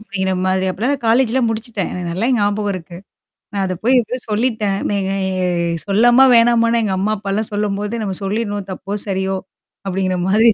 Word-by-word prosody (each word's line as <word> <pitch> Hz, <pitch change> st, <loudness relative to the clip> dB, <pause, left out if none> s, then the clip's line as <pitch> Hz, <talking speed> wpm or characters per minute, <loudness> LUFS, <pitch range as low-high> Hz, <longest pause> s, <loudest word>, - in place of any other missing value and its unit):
அப்படிங்கிற 190 Hz, -3 st, -2 dB
மாதிரி 190 Hz, 0 st, +1 dB
அப்பலாம் 235 Hz, +9 st, -1 dB
நான் 270 Hz, -4 st, -9 dB
காலேஜ்லாம் 240 Hz, 0 st, +3 dB
முடிச்சுட்டேன். 220 Hz, -3 st, -3 dB
எனக்கு 180 Hz, -1 st, -4 dB
நல்லா 220 Hz, +8 st, 0 dB
ஞாபகம் 205 Hz, 0 st, 0 dB
இருக்கு. 170 Hz, -1 st, -8 dB, 0.6 s
நான் 200 Hz, -1 st, -1 dB
அத 185 Hz, -, -2 dB
போய் 255 Hz, +1 st, +5 dB
எதோ 245 Hz, +3 st, -4 dB
சொல்லிட்டேன். 210 Hz, -3 st, 0 dB
நீ 205 Hz, -, 0 dB, 0.9 s
சொல்லமா 240 Hz, +6 st, +5 dB
வேணாமான்னு 230 Hz, 0 st, +4 dB
எங்க 195 Hz, -3 st, 0 dB
அம்மா 215 Hz, +3 st, +1 dB
அப்பாலாம் 205 Hz, +2 st, -3 dB
சொல்லும்போது, 205 Hz, +1 st, -2 dB
நம்ம 195 Hz, -3 st, -3 dB
சொல்லிடணும், 205 Hz, -1 st, -2 dB
தப்போ! 195 Hz, +2 st, -5 dB
சரியோ! 190 Hz, 0 st, -1 dB, 0.5 s
அப்படிங்கிற 185 Hz, -1 st, -1 dB
மாதிரி 220 Hz, +4 st, +5 dB
205 Hz, 160 wpm, -18 LUFS, 195-230 Hz, 0.9 s, போய்